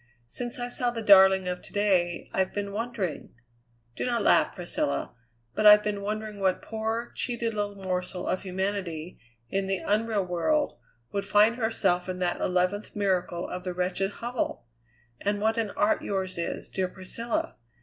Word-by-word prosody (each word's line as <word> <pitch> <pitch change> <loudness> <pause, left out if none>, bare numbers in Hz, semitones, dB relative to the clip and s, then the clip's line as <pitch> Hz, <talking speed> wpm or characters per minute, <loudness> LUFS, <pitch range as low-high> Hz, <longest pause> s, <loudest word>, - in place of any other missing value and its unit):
Since 240 - -3
I 245 0 -3
saw 245 0 0
the 230 -2 -4
darling 190 -2 +7
of 180 0 -3
to - - -13
day 185 -4 +1
I've 190 -1 +1
been 200 -1 -2
wondering 215 - -4 0.6
do - - -3
not 240 -3 0
laugh, - - +4
Priscilla 150 -7 -2 0.4
but 215 - +4
I've 210 0 +9
been 205 -1 -2
wondering 215 0 -4
what 190 -1 +1
poor, 225 +2 -3
cheated 235 -2 -2
little 205 -1 -2
morsel 185 -1 -3
of 185 - 0
humanity, 185 -3 -3 0.3
in 195 +5 -1
the 195 0 +1
unreal 215 -1 +1
world, 235 - 0 0.3
would 200 0 -2
find 210 +3 +4
herself 195 -6 +1
in 185 - -3
that 180 -1 -1
eleventh 185 +3 0
miracle 185 -4 0
of 180 0 -5
the 180 -1 -4
wretched 180 +2 0
hovel? 240 - -3 0.5
And 205 0 0
what 220 +2 +1
an 220 -2 0
art 205 +1 +3
yours 190 -2 -2
is, 170 - -4
dear 190 -1 0
Priscilla! 195 +6 -4
200 Hz, 165 wpm, -27 LUFS, 185-220 Hz, 0.6 s, I've